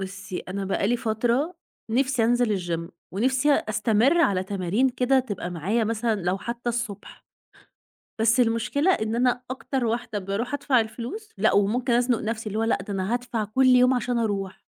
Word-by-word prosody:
بُصي، 190 -1 -6
أنا 195 +1 -5
بقى 195 +1 0
لي 245 - +2
فترة 235 +9 0 0.4
نفسي 255 0 +2
أنزل 235 -3 +2
الgym، 170 -2 -4 0.2
ونفسي 260 +7 +2
أستمرّ 225 +6 +2
على 195 - +2
تمارين 195 +6 0
كده 255 +1 +2
تبقى 205 -8 -4
معايا، 195 +7 0
مثلًا 225 -1 -1
لو 180 +2 0
حتى 235 +3 -5
الصبح. 230 -4 -5 1.0
بس 225 +2 +3
المشكلة 245 +8 +2
إن 220 -8 -1
أنا 245 +1 +1
أكتر 260 -1 -2
واحدة 230 -2 -2
بارُوح 200 +7 -3
أدفع 270 -2 +2
الفلوس، 250 - -7
لأ، - - +3
وممكن 235 +5 +2
أزنّق 245 -1 +2
نفسي، 220 0 -4
اللي 210 +1 -2
هو - - +1
لأ، 225 - +2
ده 205 - -4
أنا 195 +3 -1
هادفع 240 -2 -2
كل 260 +6 +1
يوم 250 0 +6
عشان 245 0 -1
أرُوح، 200 -4 -3
230 Hz, 170 wpm, -25 LUFS, 205-250 Hz, 1.0 s, يوم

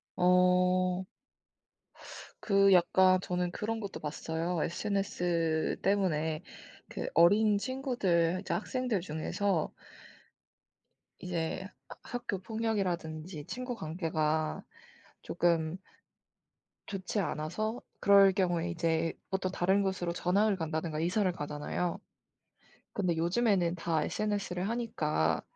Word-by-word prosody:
어. 180 0 +3 1.4
그 195 -2 +4
약간 185 +1 +5
저는 180 -1 -2
그런 225 +4 -3
것도 200 -3 -6
봤어요. 160 +3 -3
SNS 175 -4 -1
때문에 160 -6 +1 0.5
그 - - -4
어린 205 +5 +5
친구들 200 - 0
이제 - - -3
학생들 250 -7 -1
중에서 165 +2 -1 1.5
이제 175 +1 -3 0.2
하 - - -10
학교 240 -5 -4
폭력이라든지 185 -7 -3
친구 250 0 -5
관계가 155 -3 -1 0.6
쪼끔 165 -1 +1 1.1
좋지 195 +1 -3
않아서 200 +7 -2 0.2
그럴 200 -1 +7
경우에 175 -3 0
이제 165 -1 0 0.2
어떤 190 -1 -1
다른 190 +2 +2
곳으로 185 -3 -1
전학을 200 +4 +2
간다든가 160 -2 -3
이사를 185 +4 +1
가잖아요. 150 +3 -3 0.9
근데 180 -5 0
요즘에는 175 0 +2
다 165 -3 0
SNS를 200 -2 -2
하니까 155 - 0
180 Hz, 230 characters per minute, -31 LUFS, 165-200 Hz, 1.5 s, 그럴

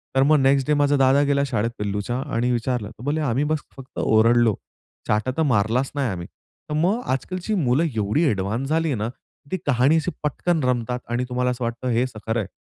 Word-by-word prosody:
तर 135 - +5
मग 150 +1 +4
next 135 0 +3
day 150 - +3
माझा 145 0 +3
दादा 135 +1 +4
गेला 140 0 +2
शाळेत 115 -2 -1
पिल्लूच्या 105 +3 -2 0.2
आणि 125 +2 +1
विचारलं 120 -2 -1
तर 115 +1 -14
बोलले, 150 +3 -1
"आम्ही 135 0 0
बस 155 0 0 0.2
फक्त 135 +1 -9
ओरडलो, 115 0 +4 0.5
चाटा 110 +5 +1
तर - - +2
मारलाच 120 +1 +1
नाही 135 -4 0
आम्ही." 85 -1 -6 0.4
तर - - -3
मग 185 +10 +1
आजकालची 185 +9 -2
मुलं 140 -2 +2
एवढी 110 +10 +1
ॲडवान्स 110 +6 -2
झाली 160 -2 +1
ना, 110 +2 -2 0.4
ती 185 - 0
कहाणी 135 +3 +3
अशी 165 +3 -1
पटकन 160 +2 0
रमतात 125 -1 0
आणि 120 +1 0
तुम्हाला 125 0 0
असं 125 0 -4
वाटतं 120 +2 -3
हेचं 120 -1 -1
खरं 110 +1 +1
आहे. 100 - -3
125 Hz, 200 wpm, -23 LUFS, 115-145 Hz, 0.5 s, तर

